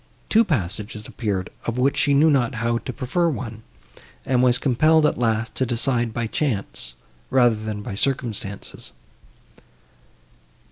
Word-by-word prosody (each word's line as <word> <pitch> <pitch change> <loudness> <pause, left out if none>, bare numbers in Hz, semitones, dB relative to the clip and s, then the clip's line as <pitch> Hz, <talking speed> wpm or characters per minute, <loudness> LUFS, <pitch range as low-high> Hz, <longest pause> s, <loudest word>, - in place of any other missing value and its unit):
Two 225 +1 +6
passages 105 - -3
appeared, 100 -5 -3 0.2
of 115 +1 -1
which 135 +2 +2
she 140 -1 +3
knew 155 +3 +5
not 125 -4 +1
how 115 0 0
to 130 - -6
prefer 165 +8 0
one, 115 -6 -5 0.6
and 125 -1 +2
was 125 -1 +5
compelled, 155 +5 +3
at 150 - +1
last, 110 -1 0
to - - 0
decide 120 -1 +1
by 115 +1 -2
chance, 105 - -2 0.3
rather 125 -3 +4
than 110 -1 -5
by 110 - -5
circumstances. 105 - -3
120 Hz, 140 wpm, -23 LUFS, 110-135 Hz, 0.6 s, Two